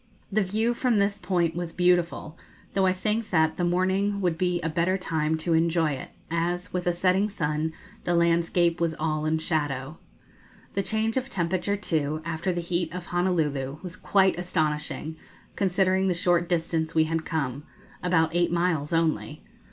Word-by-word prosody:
The 215 +2 +2
view 215 +5 +1
from 240 -2 +1
this 200 0 +1
point 175 -5 0
was 175 -1 -3
beautiful, 175 -2 +1 0.4
though 195 -1 +3
I - - +4
think 210 +4 -1
that 160 -3 +2
the 175 - -1
morning 190 +3 +1
would 175 -4 +1
be 180 +1 0
a 165 - -1
better 170 +4 +1
time 160 -3 -1
to 165 +2 -1
enjoy 165 -1 +2
it, 135 -2 -5 0.2
as, 175 +3 -1
with 180 -1 -2
a - - +4
setting 185 +4 +2
sun, 155 -4 -1 0.3
the 175 - +1
landscape 170 0 +2
was 165 -1 +1
all 155 -1 -1
in 160 +1 +2
shadow. 150 -3 -2 0.7
The 195 - +1
change 220 +4 0
of 260 +1 -2
temperature, 185 -1 0
too, 155 -5 -1
after 170 +3 -1
the 175 -1 -2
heat 170 -1 -1
of 180 - -5
Honolulu, 155 -6 0
was 180 -1 -6
quite 190 -3 +2
astonishing, 155 -2 -2 0.4
considering 190 0 +2
the 180 - +1
short 175 0 +2
distance 165 -2 -1
we 160 - +5
had 160 0 -1
come 140 -5 -2 0.4
about 165 -2 +2
eight 175 0 +2
miles 170 -4 0
only. 160 -2 0
175 Hz, 170 wpm, -26 LUFS, 160-185 Hz, 0.7 s, we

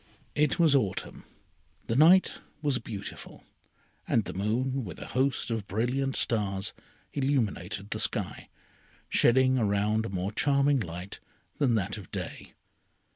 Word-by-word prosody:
It 150 +1 +2
was 165 -5 +5
autumn. 105 -9 -1 0.6
The 115 - -1
night 170 +7 +6 0.2
was 140 -4 +1
beautiful, 105 -3 -8 0.6
and 115 - +2
the - - -5
moon, 125 +7 -1
with 90 -7 -7
a - - -6
host 130 -1 0
of 110 -3 -2
brilliant 125 +6 0
stars, 100 -3 0 0.4
illuminated 110 - -1
the - - -2
sky, - - -3 0.6
shedding 130 +1 +4
around 105 +1 +1
a - - -6
more 95 +1 -2
charming 140 +3 +3
light 90 -1 -6 0.4
than 130 -6 +3
that 105 0 -1
of 95 - -12
day. - - -7
115 Hz, 130 wpm, -29 LUFS, 100-135 Hz, 0.6 s, night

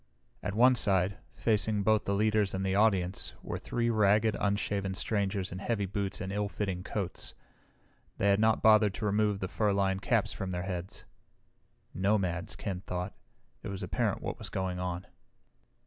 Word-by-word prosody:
At 100 +2 -3
one 125 +3 +6
side, 100 -3 +3
facing 105 -2 +1
both 110 +1 +3
the 100 - 0
leaders 105 -1 +2
and 95 +1 -2
the 95 - +1
audience, 95 -5 +1
were - - -4
three 120 -1 -1
ragged, 105 0 +3
unshaven 100 -1 -1
strangers 100 -2 -1
in 90 - -5
heavy 100 0 -1
boots 95 0 -3
and 95 +1 -4
ill 105 0 -1
fitting 95 -3 -3
coats. 95 -3 -4 0.8
They 100 - +2
had 100 - +3
not 110 0 +3
bothered 110 -2 +5
to 110 - -4
remove 105 -1 +1
the 95 - -1
fur 105 +2 +1
lined 95 -1 +1
caps - - +1
from 95 - -4
their 90 -1 -3
heads. 90 -1 -5 0.9
Nomads, 95 -1 0
Ken 95 -3 -4
thought. 90 -1 -4 0.5
It - - -7
was 100 -1 -5
apparent - - -1
what - - -4
was - - -4
going 95 -1 -2
on. 90 0 -3
100 Hz, 170 wpm, -30 LUFS, 95-105 Hz, 0.9 s, one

